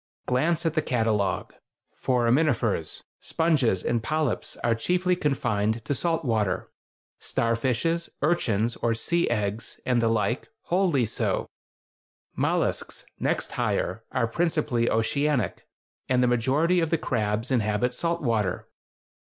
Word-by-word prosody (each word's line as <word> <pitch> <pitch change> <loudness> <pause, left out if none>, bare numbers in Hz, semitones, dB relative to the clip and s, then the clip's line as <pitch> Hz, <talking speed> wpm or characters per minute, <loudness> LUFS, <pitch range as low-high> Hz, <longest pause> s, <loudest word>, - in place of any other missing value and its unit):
Glance 155 +7 +1
at 165 - +1
the 155 - +2
catalogue: 110 -7 0 0.4
Foraminifers, 120 - +1 0.2
sponges, 140 - +1
and 120 -1 0
polyps 155 0 -1
are 120 - +3
chiefly 180 +10 +1
confined 115 - 0
to - - 0
salt 165 +2 0
water; 105 -6 0 0.5
starfishes, 125 +9 0
urchins 115 -9 +1
(or 115 -1 0
sea 170 +9 +1
eggs), 105 -1 -2
and 125 -2 +2
the 115 - +2
like, 115 +2 0
wholly 175 -8 +2
so: 110 - -1 0.9
mollusks - - -1
(next - - -1
higher) - - -1
are - - +1
principally 145 -3 0
oceanic, 125 - 0 0.4
and 125 -1 +3
the - - +4
majority 135 +9 +2
of 165 -2 +1
the 165 - +2
crabs 110 -2 -1
inhabit 115 0 +1
salt 170 -1 -1
water. 110 -7 0
125 Hz, 120 wpm, -26 LUFS, 115-155 Hz, 0.9 s, the